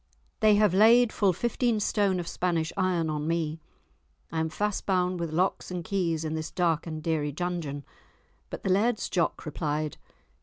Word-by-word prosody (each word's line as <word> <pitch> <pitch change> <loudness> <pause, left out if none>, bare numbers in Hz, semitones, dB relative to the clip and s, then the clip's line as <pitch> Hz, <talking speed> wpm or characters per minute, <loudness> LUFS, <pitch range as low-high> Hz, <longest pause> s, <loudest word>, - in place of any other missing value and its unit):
They 215 -1 +5
have 205 -3 +3
laid 225 +4 +6
full 200 -3 +3
fifteen 235 +4 0
stone 200 -3 +1
of 170 - -5
Spanish 170 -3 -1
iron 185 -4 +1
on 150 0 -2
me, 160 -1 -1 0.7
I 160 - -2
am 160 0 0
fast 210 +4 -2
bound 180 -2 +1
with 170 -2 -3
locks 180 +4 0
and 180 -1 -4
keys 165 -4 -1
in 155 - -2
this 160 0 -3
dark 170 -2 0
and 155 -1 -5
dreary 155 -3 0
dungeon." 155 -3 -4 0.6
But - - -7
the 190 - +1
Laird's 215 +4 +1
Jock 175 -3 -1
replied. 155 -1 -2
175 Hz, 175 wpm, -28 LUFS, 160-195 Hz, 0.7 s, laid